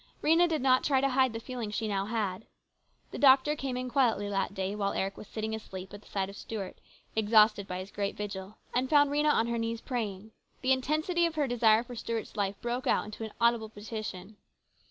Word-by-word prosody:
Rhena 335 +3 +5
did 315 -5 -1
not 255 -1 +4
try 275 -3 +3
to 275 +1 +2
hide 260 -1 +3
the 225 - -5
feeling 240 -2 -5
she 215 +1 -2
now 195 -2 -1
had. 215 -3 -2 0.6
The - - -6
doctor 275 +2 +6
came 265 -3 -3
in 255 0 -3
quietly 235 -6 +2
that 195 0 -1
day 190 +1 -2
while 200 -1 -1
Eric 195 +1 -2
was 215 - -11
sitting 220 0 -4
asleep 190 -4 -7
at 205 - -9
the - - -20
side 195 -1 -2
of 200 - -10
Stuart, 205 -3 -6 0.3
exhausted 215 -2 +4
by 180 - -4
his 185 +2 -7
great 200 -1 -3
vigil, 200 -1 -6 0.2
and 255 +2 0
found 290 -2 +5
Rhena 300 +1 +3
on 225 - +2
her 235 0 -1
knees 230 0 -2
praying. 215 -4 -4 0.3
The 260 - +1
intensity 310 +6 +2
of 330 - -6
her 300 -2 +1
desire 230 -3 +4
for 245 0 -10
Stuart's 230 -1 -4
life 200 -1 -1
broke 240 +2 -2
out - - +2
into 215 +1 -7
an 220 - -6
audible 235 -2 +2
petition. 210 -2 -7
225 Hz, 215 wpm, -30 LUFS, 205-260 Hz, 0.6 s, doctor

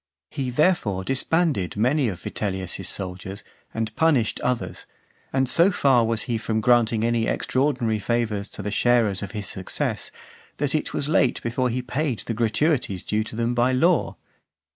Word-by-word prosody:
He, 135 -4 -3
therefore, 125 - +1
disbanded 135 - 0
many 130 +5 +2
of 95 -5 -4
Vitellius's 95 -2 -3
soldiers, 95 +1 -3 0.3
and 110 -1 -3
punished 145 -9 +2
others; 125 -1 -2 0.4
and 130 0 +1
so 170 +8 +5
far 135 -9 +3
was 115 -1 0
he 120 -3 -2
from 110 0 -1
granting 115 -1 +3
any 115 -1 +1
extraordinary 130 -5 0
favours 105 -1 -1
to 100 - -8
the 105 - -3
sharers 115 -3 +2
of 100 -2 -6
his 105 -1 -4
success, 95 0 -2 0.5
that 145 -1 -1
it 155 - -1
was 140 - -2
late 140 -5 +2
before 125 +2 0
he 125 +1 -2
paid 125 - -2
the 115 - -2
gratuities 115 - 0
due 105 +1 0
to 110 - -8
them 115 +1 0
by 120 +2 +2
law. 170 +6 +2
120 Hz, 165 wpm, -24 LUFS, 105-130 Hz, 0.5 s, so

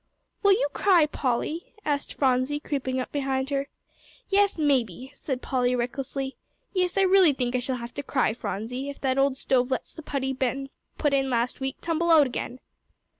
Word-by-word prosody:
"Will 400 -1 +6
you - - +2
cry, 360 -6 +5
Polly?" 300 - -2
asked 290 -1 -1
Phronsie, 260 +2 +1
creeping 260 -3 -2
up 255 - -4
behind 270 -1 -1
her. 275 0 0 0.6
"Yes, 400 -1 +3
maybe," 265 - 0
said 265 -2 -4
Polly, 250 -1 +1
recklessly. 265 +2 -3 0.4
"Yes, 365 -1 0
I - - +5
really 375 -5 +6
think 250 -2 -1
I - - +2
shall 255 +1 -2
have 235 -1 -7
to 285 - -4
cry, 265 -5 +1
Phronsie, 235 +5 -4
if 280 - -8
that 265 -1 +1
old 275 -1 +2
stove 255 -2 +1
lets 260 - -3
the 320 - -9
putty 270 -3 -2
Ben 265 +1 -2 0.3
put 295 -2 +1
in 270 -1 +2
last 240 0 0
week 265 0 -3
tumble 335 0 0
out 315 -3 +7
again." 255 0 -4
270 Hz, 180 wpm, -26 LUFS, 255-295 Hz, 0.6 s, out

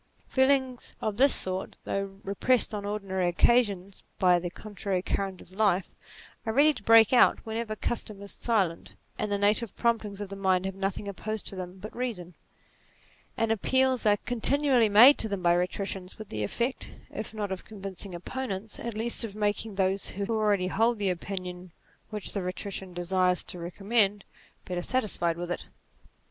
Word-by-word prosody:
Feelings 260 -2 +1
of 215 -2 -2
this 275 +2 +8
sort, 185 0 0
though 195 0 -3
repressed 225 +5 +2
on 205 -1 -4
ordinary 195 -3 -2
occasions 200 0 +2 0.2
by 180 -1 +4
the 175 0 -4
contrary 195 -1 -4
current 195 -2 -2
of - - -15
life, 195 -2 +1 0.5
are 220 - -2
ready 295 +5 +5
to 250 - -10
break 225 +2 +6
out 250 - +5
whenever 220 0 -3
custom 215 -2 -3
is 200 - -7
silent, 195 -8 -1 0.2
and 210 -1 -2
the 200 - +1
native 205 +2 +1
promptings 220 -4 0
of 205 -2 -5
the 195 - -6
mind 190 -1 +1
have 195 - -2
nothing 195 +1 -3
opposed 215 +2 -5
to - - -5
them 185 0 -7
but 210 +3 -9
reason: 220 -8 -4 1.0
and 225 -1 +1
appeals 260 +4 +2
are 205 0 +5
continually 245 -1 +3
made 240 +8 +8
to 220 - +1
them 200 -3 -3
by 175 0 +5
rhetoricians, 185 +1 -2
with 215 -2 -9
the 105 - -4
effect, 235 - -2 0.2
if - - -5
not 210 -3 -4
of 190 - -4
convincing 195 -2 -7
opponents, 210 +1 -5
at 235 -2 -5
least 235 +2 -1
of 210 -3 -5
making 210 0 -1
those 190 0 0
who 200 +1 -4
already 205 -4 +2
hold 225 +6 +1
the 200 -2 +1
opinion 180 0 -6 0.4
which 210 -2 -5
the 200 - -2
rhetorician 185 +1 -5
desires 180 +1 +1
to 180 - -7
re 170 0 -5
commend, 205 +1 +1 0.4
better 180 -1 -3
satisfied 175 -7 0
with 175 0 -5
it. - - -4
200 Hz, 175 wpm, -28 LUFS, 185-225 Hz, 1.0 s, this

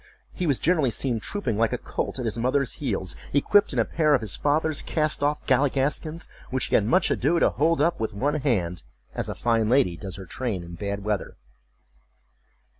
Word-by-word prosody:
He 180 - -2
was 140 -4 +2
generally 160 -6 +2
seen 120 0 -1
trooping 120 - -2
like 115 -1 +2
a - - 0
colt - - -4
at 125 - -3
his 115 +1 -2
mother's 130 +2 +1
heels, 95 - -2 0.2
equipped 200 +9 +4
in - - -4
a - - +3
pair 155 -3 +2
of 130 - 0
his 105 -5 0
father's 155 +1 +1
cast 155 -2 0
off 145 +1 0
galligaskins, 145 +4 +1 0.2
which 130 -1 -1
he - - -6
had 105 - +4
much 120 - +3
ado 160 +7 +2
to - - +3
hold 160 +1 +1
up 170 +2 +2
with 110 -3 -3
one 140 +8 0
hand, 90 - 0 0.3
as - - -3
a - - -4
fine 115 -2 +1
lady 125 -9 +3
does 95 0 -6
her 95 0 -8
train 100 -1 -3
in 85 0 -10
bad 100 +3 -4
weather. 105 -2 -3
130 Hz, 200 wpm, -25 LUFS, 105-150 Hz, 0.3 s, equipped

